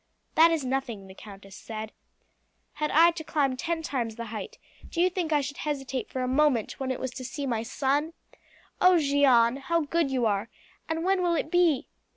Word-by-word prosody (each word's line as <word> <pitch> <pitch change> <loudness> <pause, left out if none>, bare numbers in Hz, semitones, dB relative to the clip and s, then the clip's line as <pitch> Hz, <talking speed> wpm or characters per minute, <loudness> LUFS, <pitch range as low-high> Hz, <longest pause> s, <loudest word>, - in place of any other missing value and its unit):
"That 325 +1 +6
is 320 -5 -1
nothing," 250 -6 -3
the 190 - -12
countess 195 -1 -12
said. 220 +1 -7 0.8
"Had 300 0 -2
I 335 +3 +6
to 330 -1 -7
climb 280 -4 0
ten 330 +4 -3
times 240 -7 -2
the 235 0 -6
height, 215 - -6 0.3
do 335 - -5
you 365 +1 +4
think 345 -3 -2
I 295 -1 +3
should 285 0 -6
hesitate 270 -5 -3
for 255 - -3
a - - -1
moment 260 -4 +1
when 265 -1 -3
it 260 - -2
was 260 - -3
to 255 - -8
see 285 +2 -5
my 235 -4 -1
son? 285 +6 -1 0.7
Oh, 365 -1 +6
Jeanne, 275 -5 +4
how 335 +5 0
good 320 0 0
you 255 -3 0
are! 210 +1 0 0.4
And 325 +1 -2
when 380 0 +2
will 345 -1 +2
it 315 0 -2
be?" 345 -6 +3
275 Hz, 200 wpm, -27 LUFS, 245-325 Hz, 0.8 s, That